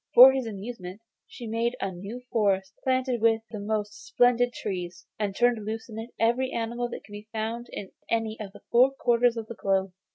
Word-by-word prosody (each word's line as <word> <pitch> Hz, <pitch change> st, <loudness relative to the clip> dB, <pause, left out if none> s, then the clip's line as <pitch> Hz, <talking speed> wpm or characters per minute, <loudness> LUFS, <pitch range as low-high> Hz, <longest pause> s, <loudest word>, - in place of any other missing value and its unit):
For 255 Hz, +2 st, +12 dB
his 265 Hz, -3 st, -2 dB
amusement 200 Hz, -2 st, -7 dB, 0.3 s
she -, -, -11 dB
had 220 Hz, -, -5 dB
made 235 Hz, +2 st, 0 dB
a 195 Hz, -, -2 dB
new 200 Hz, +7 st, -7 dB
forest, 195 Hz, -4 st, +1 dB
planted 255 Hz, -2 st, +1 dB
with 225 Hz, -1 st, +3 dB
the 215 Hz, -, -5 dB
most 210 Hz, 0 st, -3 dB
splendid 245 Hz, 0 st, +3 dB
trees, 180 Hz, -4 st, -5 dB
and 205 Hz, -2 st, -1 dB
turned 240 Hz, -2 st, +2 dB
loose 220 Hz, +2 st, -5 dB
in 220 Hz, 0 st, -6 dB
it 225 Hz, +2 st, -6 dB
every 240 Hz, +3 st, +2 dB
animal 235 Hz, +1 st, -2 dB
that -, -, -7 dB
could 205 Hz, -, -17 dB
be 205 Hz, +1 st, -9 dB
found 225 Hz, +2 st, -3 dB
in 195 Hz, -, -7 dB, 0.2 s
any 225 Hz, -1 st, 0 dB
of 205 Hz, -3 st, -6 dB
the -, -, -14 dB
four 250 Hz, +3 st, +6 dB
quarters 240 Hz, -3 st, +2 dB
of 225 Hz, -, -3 dB
the 235 Hz, -, -7 dB
globe. 195 Hz, -3 st, 0 dB
225 Hz, 205 wpm, -27 LUFS, 205-240 Hz, 0.3 s, For